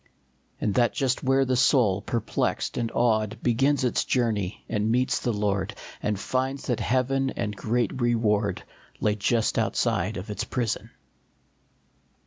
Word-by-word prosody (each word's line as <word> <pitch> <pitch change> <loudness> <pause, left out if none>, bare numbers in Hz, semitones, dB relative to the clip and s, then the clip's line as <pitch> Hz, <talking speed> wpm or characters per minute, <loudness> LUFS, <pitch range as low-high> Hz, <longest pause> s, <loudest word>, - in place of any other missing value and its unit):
And 105 - 0
that 120 +1 +3
just 135 -1 0
where 135 0 +3
the 130 0 +1
soul, 120 -6 +3
perplexed 115 +2 -1
and 115 -1 -2
awed, 110 -3 +1
Begins 135 +4 +2
its 125 - +1
journey, 110 -6 -1
it 110 - -1
meets 120 +5 +1
the 120 - -1
Lord, 105 -3 -1 0.3
And 105 -2 -1
finds 130 +5 -2
that 120 -3 -1
heaven 135 +2 +1
and 105 -4 -3
the - - -13
great 120 +4 -1
reward 105 -4 +1 0.4
Lay 105 - +2
just 110 +2 +1
outside 110 -3 0
of 95 +3 -6
its 100 - -3
prison 120 -4 -2
115 Hz, 145 wpm, -26 LUFS, 105-125 Hz, 0.4 s, that